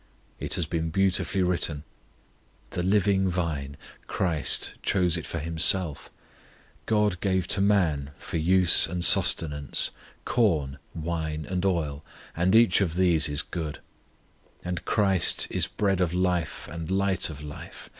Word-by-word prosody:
It - - -3
has 85 - -1
been 80 0 -3
beautifully 95 +1 0
written: 85 -4 -1 0.9
The - - -3
living 95 0 +1
Vine, 75 -6 -4 0.3
CHRIST 80 -6 +1
chose 90 -3 +1
it 85 - -4
for - - -5
Himself: 80 0 +1 0.8
GOD 105 -4 +1
gave 95 -2 -1
to 100 - +1
man 85 -9 +1
for - - -6
use 90 +2 +5
and 85 +1 0
sustenance 75 -3 +3 0.3
Corn, 75 - 0 0.2
wine, 80 -2 -4
and 90 +3 -3
oil, 80 -6 -2 0.3
and 90 +5 +1
each 115 -5 +4
of 85 -4 -1
these 85 -4 +2
is 75 +1 0
good: 80 -4 -6 0.9
And 90 -1 -4
CHRIST 95 -5 +2
is - - 0
Bread 95 -3 -1
of 90 -1 -1
life 90 -3 -2
and 85 -1 -7
Light 95 -2 +1
of 75 -1 -9
life. 75 0 -10
85 Hz, 135 wpm, -26 LUFS, 80-95 Hz, 0.9 s, use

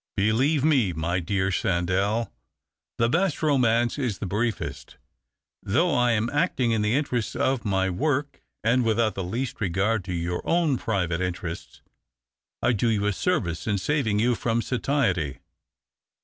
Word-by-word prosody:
"Believe 130 +9 +2
me, 130 - +3
my 85 +3 -1
dear 95 +2 -1
Sandell, 95 +6 0 0.7
the 115 - +3
best 170 +4 0
romance 120 -4 +2
is 120 -8 -1
the - - -5
briefest. 105 +4 -3 0.7
Thousfh 160 - +2
I 125 -1 +3
am 110 +1 +1
actino 145 -6 +1
in 110 - +1
the 105 +3 +1
interests 125 -6 -1
of 130 -3 0
my 95 -2 +1
work 140 - -1 0.2
and 120 +3 +3
without 115 -1 +1
the 95 - -4
least 120 +9 -4
regard 100 +3 0
to 90 - -4
your 85 +1 -2
own 165 -6 +1
private 90 -5 -1
interests, 90 -2 -5 0.8
I 125 - +3
do 115 +2 0
you 105 -2 +1
a 105 - +1
service 85 - -1
in 105 -2 +1
saving 110 0 0
you 120 +3 +3
from 115 0 -1
satiety. 125 - 0
110 Hz, 150 wpm, -25 LUFS, 95-130 Hz, 0.8 s, me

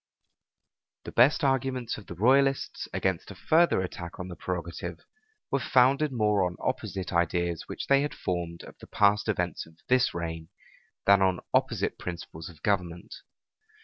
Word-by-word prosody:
The - - -7
best 125 +6 +4
arguments 130 -3 0
of 105 - -15
the 85 - -7
royalists 135 +7 +2
against 95 -3 -1
a 100 - -9
further 165 - +3
attack 90 -2 -6
on 90 0 -5
the 90 - -7
prerogative, 85 -1 -5 0.5
were 140 - +2
founded 135 +4 +3
more 105 -5 +2
on 90 -1 -1
opposite 95 -3 -3
ideas 85 0 0
which - - -5
they 140 0 +4
had 145 - -3
formed 85 -2 -3
of - - -12
the - - -12
past 100 +1 +3
events 90 -6 -1
of 80 0 -20
this 130 0 +4
reign, 80 -1 -5 0.6
than 100 -1 +6
on 95 -1 +2
opposite - - +1
principles 85 -2 -7
of 80 -2 -16
government. 90 -4 -1
95 Hz, 155 wpm, -28 LUFS, 85-125 Hz, 0.6 s, than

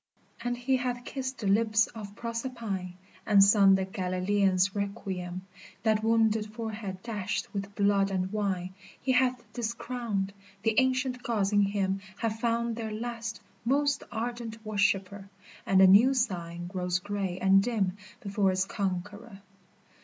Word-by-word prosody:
And 245 0 -1
he 260 +2 +1
hath 245 -1 -3
kissed 265 -1 -4
the 210 - -3
lips 215 +2 +4
of 205 -3 -9
Proserpine, 230 -6 -4 0.3
And 200 -1 +6
sung 200 -1 +6
the 190 0 0
Galilaean's 190 0 +1
requiem, 190 -3 -4 0.4
That 215 -1 +3
wounded 220 -1 +2
forehead 215 -4 -5
dashed 210 -4 -3
with 200 0 -5
blood 200 -1 +3
and 190 0 -2
wine 190 -3 -1 0.3
He 260 - 0
hath 250 -1 +2
discrowned, 235 -4 -3 0.3
the 225 - +2
Ancient 260 -1 +1
Gods 210 -4 0
in 205 - +5
him 195 -1 0 0.2
Have 225 -1 -2
found 235 0 0
their 220 -2 -4
last, 230 +1 -5 0.2
most 280 +3 +2
ardent 230 -1 -5
worshiper, 200 -1 0 0.4
And 190 - +4
the - - +9
new 220 +8 +7
Sign 175 -8 -2
grows 180 -1 -1
gray 195 -1 -3
and 190 +1 +5
dim 200 -5 0 0.3
before 200 -1 +1
its 185 0 +1
conqueror. 200 +1 -4
210 Hz, 140 wpm, -29 LUFS, 195-235 Hz, 0.4 s, the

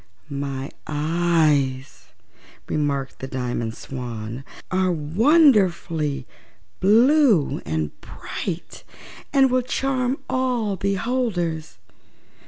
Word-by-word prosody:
"My 140 -1 -4 0.2
eyes," 150 - +1 0.6
remarked 140 -3 -2
the 130 - -5
Diamond 120 -3 -3
Swan, 120 -2 -6 0.3
"are 185 0 +2
wonderfully 170 - +3 0.5
blue 230 - +4
and 80 -2 -1
bright 180 -3 -6 0.5
and 270 -2 +4
will 255 0 +3
charm 255 +1 -1
all 245 -6 0
beholders." 195 -5 -1
170 Hz, 75 wpm, -23 LUFS, -, 0.6 s, blue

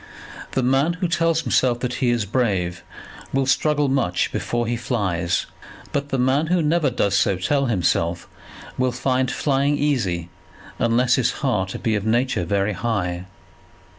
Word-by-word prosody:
The 130 - +1
man 135 +6 +2
who 180 +1 -2
tells 165 -1 +1
himself 125 -3 +1
that 125 -1 -2
he 125 - +3
is 120 -3 +1
brave, 95 -7 -1 0.5
will 135 0 +1
struggle 150 +2 +2
much 130 -10 0
before 120 0 -2
he 120 +1 -1
flies; 95 -8 -1 0.5
but 140 0 -2
the 135 - -1
man 130 +5 +2
who 175 0 +2
never 155 0 +2
does 100 -5 0
so 100 -2 +2
tell 140 +9 +1
himself, 85 -4 0 0.5
will 130 0 +2
find 130 +1 0
flying 140 +3 +1
easy 100 - 0 0.5
unless 120 +1 +3
his 125 -2 +2
heart 95 -7 0
be 115 - +1
of 105 -2 -1
nature 115 -3 +1
very 100 +3 0
high. 95 -6 -2
125 Hz, 155 wpm, -22 LUFS, 100-135 Hz, 0.5 s, he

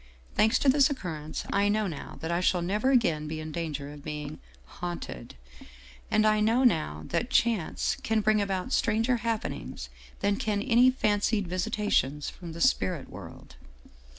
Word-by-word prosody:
Thanks 220 +3 +4
to - - -1
this 270 0 +5
occurrence 160 - -5
I 200 +1 +3
know 215 +1 +1
now 165 -7 -6
that 160 +1 -3
I 170 - +1
shall 180 -1 +2
never 210 +8 +1
again 170 - +2
be 155 +1 -4
in 155 0 -6
danger 150 -3 -4
of 145 -1 -12
being 150 0 -6 0.2
' - - -28
haunted/ 175 - -6 0.4
" - - -21
And 215 - +3
I 215 0 +4
know 225 +4 +3
now 80 - +1
that 240 - -1
Chance 225 -9 +1
can 220 -1 +1
bring 215 0 +3
about 195 +4 -2
stranger 230 +3 +2
happenings 230 -1 -4 0.3
than 200 0 +1
can 210 -2 -1
any 245 +1 +5
fancied 205 -4 +1
visitations 180 - 0
from 170 -3 -9
the 170 - -7
spirit 95 - +1
world. - - -11
200 Hz, 170 wpm, -28 LUFS, 155-220 Hz, 0.4 s, this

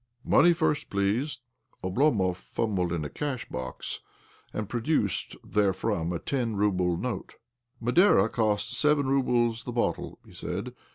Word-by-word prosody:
" - - -40
Money 175 - +7
first, 160 -3 0
please! 115 +8 0 0.2
" - - -38
Oblomov 95 -2 +2
fumbled 95 -1 -2
in 80 -3 -1
a - - -1
cashbox, 125 - -4 0.5
and 110 -2 -3
pro 120 +3 -2
^ - - -9
duced 115 - 0
therefrom 100 -3 0
a 85 - -1
ten 120 +1 -2
rouble 90 -4 +1
note. 125 +5 -4 0.2
" 120 +1 -45
Madeira 120 - +5
costs 110 +1 0
seven 150 0 +3
roubles 120 -4 +2
the 125 - -5
bottle," 120 0 -1
he - - -16
said. - - -4
115 Hz, 155 wpm, -28 LUFS, 95-130 Hz, 0.5 s, Money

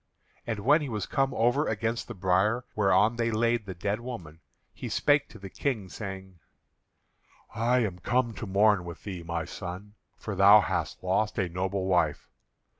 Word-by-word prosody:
And 110 -3 -2
when 145 +8 +4
he 145 - -4
was 105 -4 -3
come 135 0 0
over 120 +6 +2
against 115 +2 -2
the 120 - -7
bier 95 +6 +1
whereon 105 +2 +3
they 115 0 +1
laid 115 0 0
the 95 - -6
dead 100 +5 -2
woman, 110 -11 -8 0.3
he - - -6
spake 145 0 +2
to - - -12
the 100 -2 -9
King, 110 -2 -3
saying: 95 -3 -8 1.1
"I 120 +2 +2
am 95 -6 -2
come 120 +4 0
to 110 - -7
mourn 100 0 +3
with 85 -1 -9
thee, 95 -4 -6
my 85 -1 -3
son, 95 +3 -7 0.2
for 105 - -5
thou 100 +2 +7
hast - - -3
lost 100 +4 0
a 95 -4 0
noble 95 +2 -2
wife. 85 -5 0
105 Hz, 175 wpm, -28 LUFS, 95-115 Hz, 1.1 s, thou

